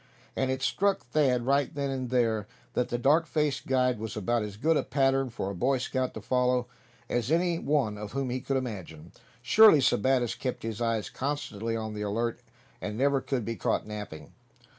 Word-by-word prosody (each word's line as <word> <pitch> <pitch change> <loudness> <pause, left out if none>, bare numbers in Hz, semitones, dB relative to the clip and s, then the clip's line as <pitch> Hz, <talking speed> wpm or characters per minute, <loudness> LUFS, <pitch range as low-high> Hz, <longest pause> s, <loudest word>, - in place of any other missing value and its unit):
And 130 - 0
it 130 0 -2
struck 200 +6 +1
Thad 125 -2 +1
right 140 0 +2
then 140 -1 -1
and 130 -2 -3
there 115 -4 +1 0.3
that 125 - 0
the 120 - -1
dark 150 +7 +3
faced 145 -4 -1
guide 125 -3 +2
was 110 0 -5
about 120 +3 0
as 105 -1 -6
good 160 +8 +2
a - - +3
pattern 135 0 +1
for 100 -4 -4
a - - -6
Boy 130 +8 +1
Scout 130 0 -2
to - - -6
follow, 125 -1 +1 0.4
as 120 +4 -1
any 170 0 +2
one 135 -10 0
whom 125 +5 -3
he 130 +1 -2
could 135 +1 -1
imagine. 90 -10 -6 0.3
Surely 215 - +7
Sebattis 125 -1 +2
kept 130 - -4
his 115 0 -4
eyes 115 -2 -1
constantly 115 -5 -3
on 110 -1 -4
the 105 - -5
alert; 115 +3 -1 0.4
and 105 +1 -4
never 135 +1 +2
could 125 -5 -2
be 115 - -3
caught - - -1
napping. 105 -8 -8
125 Hz, 190 wpm, -28 LUFS, 110-135 Hz, 0.4 s, Surely